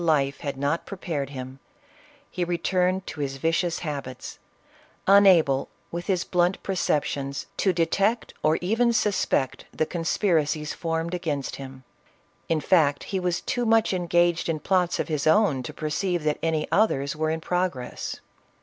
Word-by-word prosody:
401 155 -4 +3
life 140 +1 -8
had 140 -2 -4
not 145 +4 -1
prepared 160 -8 -4
him, 130 -1 -8 0.7
he 180 - -2
returned 180 +2 0
to 160 - -8
his 135 -2 -2
vicious 165 +3 0
habits, 140 -5 -6 0.7
unable 185 -9 +5 0.2
with 175 +1 -5
his 185 -3 +1
blunt 180 +1 +1
perceptions 145 -7 -1
to 190 - +3
detect, 195 +7 0
or 155 +1 +3
even 230 +6 +2
suspect, 195 - 0
the 155 - 0
conspiracies 160 -3 0
formed 165 0 -2
against 150 -6 -3
him. 130 -1 -9 0.7
In 160 -2 +1
fact 145 -6 +3
he 190 - +1
was 180 -1 -1
too 245 - -1
much 225 -2 +3
engaged 175 -1 +1
in 160 -2 0
plots 180 +2 +1
of - - -1
his 155 -2 -1
own 160 -6 +4
to 125 - -6
perceive 170 +2 -2
that 150 -1 0
any 160 -2 0
others 140 -10 +2
were 155 +1 0
in 160 0 -1
progress. 175 -7 -3
165 Hz, 150 wpm, -25 LUFS, 145-185 Hz, 0.7 s, unable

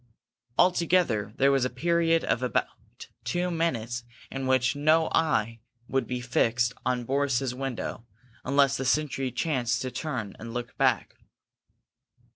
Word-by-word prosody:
Altogether, 170 - +3
there 140 +1 +4
was 135 -2 +2
a 130 - +1
period 165 +4 +2
of 120 - 0
almost 125 - -3
two 180 0 -1
minutes 120 -8 -1 0.3
in 135 -1 -3
which 130 +1 +2
no 155 +2 +3
eye 115 -8 +1 0.3
would 135 -3 0
be 125 -1 -2
fixed 120 0 +1
on 125 -1 0
Boris's 135 -1 0
window, 125 -3 -5 0.4
unless 140 0 +3
the 135 - -3
sentry 135 -2 0
chanced 130 -5 0
to 130 - -4
turn 125 -7 -4
and 115 +2 -8
look 120 -1 -5
back. - - +1
130 Hz, 135 wpm, -27 LUFS, 120-155 Hz, 0.4 s, there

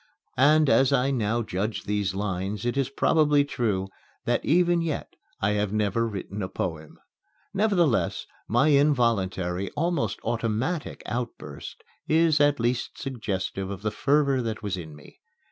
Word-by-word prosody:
And, 150 +3 +5
as 135 -1 +4
I 130 +2 +2
now 115 -2 0
judge 105 +2 -3
these 100 -2 -1
lines, 100 +1 -3
it 120 - 0
is 135 -2 0
probably 145 0 +3
true 110 -9 -1 0.4
that - - +1
even 175 +1 +3
yet 160 -3 -4 0.2
I 105 - +1
have 105 -1 0
never 110 +2 +1
written 100 -1 -5
a 95 - -3
poem. 80 -3 -5 0.6
Nevertheless, 190 - +1 0.2
my 120 +7 +3
involuntary, 100 -11 +2
almost 160 - 0
automatic 115 +8 -2
outburst 120 +1 -6 0.3
is 160 -1 +4
at 145 -1 +3
least 120 +1 -1
suggestive 100 -7 -3
of 100 0 -6
the 105 - 0
fervor 140 +3 +2
that 110 -2 -4
was 100 -2 -2
in 80 -4 -8
me. 75 - -16
115 Hz, 145 wpm, -26 LUFS, 100-145 Hz, 0.6 s, And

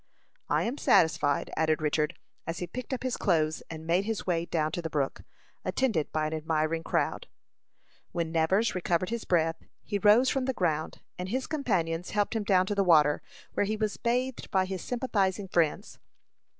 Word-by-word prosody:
"I - - +2
am 250 +5 -3
satisfied," 145 -3 +3
added 155 -1 +2
Richard, 155 +2 0 0.3
as 165 +1 -3
he 180 - -3
picked 250 +11 -7
up 260 - -3
his 255 -1 -1
clothes, 155 -5 +1
and 160 -1 -7
made 175 +4 +2
his 225 -1 -3
way 170 -2 0
down 155 -2 0
to 175 - -3
the 165 - -4
brook, 145 -3 -1 0.4
attended 225 - 0
by 155 0 0
an 155 - -2
admiring 160 +1 0
crowd. - - -1 0.8
When 165 -2 -2
Nevers 175 +7 +2
recovered 180 +1 0
his 235 -1 -3
breath, 165 -2 +2 0.3
he 205 -2 -2
rose 215 +5 +6
from 265 -1 +1
the 265 - 0
ground, 160 -7 -1 0.2
and 180 +1 -4
his 260 +4 -1
companions 180 - -1
helped 210 +2 0
him 220 - 0
down 185 -2 +3
to 205 - -1
the 200 -1 +2
water, 150 -5 +5 0.3
where 205 - +1
he 215 +1 -1
was 215 -1 -1
bathed 250 +2 -1
by 190 -2 +2
his 190 -1 -4
sympathizing 205 -6 -1
friends. 170 -4 0
180 Hz, 185 wpm, -29 LUFS, 160-215 Hz, 0.8 s, rose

